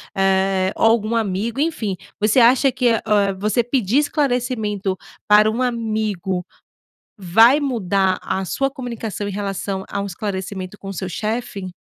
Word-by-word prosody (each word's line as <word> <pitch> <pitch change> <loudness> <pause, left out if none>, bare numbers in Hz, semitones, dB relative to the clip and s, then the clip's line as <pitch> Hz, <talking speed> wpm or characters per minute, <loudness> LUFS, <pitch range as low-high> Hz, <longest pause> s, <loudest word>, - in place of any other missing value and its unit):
eh, 190 0 +2
ou - - +1
algum 225 0 0
amigo, 220 +3 -1
enfim, 265 - -1 0.2
você 215 +4 +3
acha 255 +3 +5
que, 250 -1 +1
eh, 225 - +1 0.4
você 215 +4 +1
pedir 240 -1 0
esclarecimento 245 -9 -1 0.3
para 210 +1 +6
um 235 +4 -2
amigo 215 -7 -2 0.7
vai 225 - +5
mudar 195 -8 0
a 190 - -2
sua 270 +8 -1
comunicação 230 -6 -5
em - - -3
relação 195 -1 -3
a 200 - -2
um - - -3
esclarecimento 190 0 -5
com 195 - -8
o - - -5
seu 185 +1 -4
chefe? 210 -2 -4
210 Hz, 145 wpm, -20 LUFS, 195-240 Hz, 0.7 s, para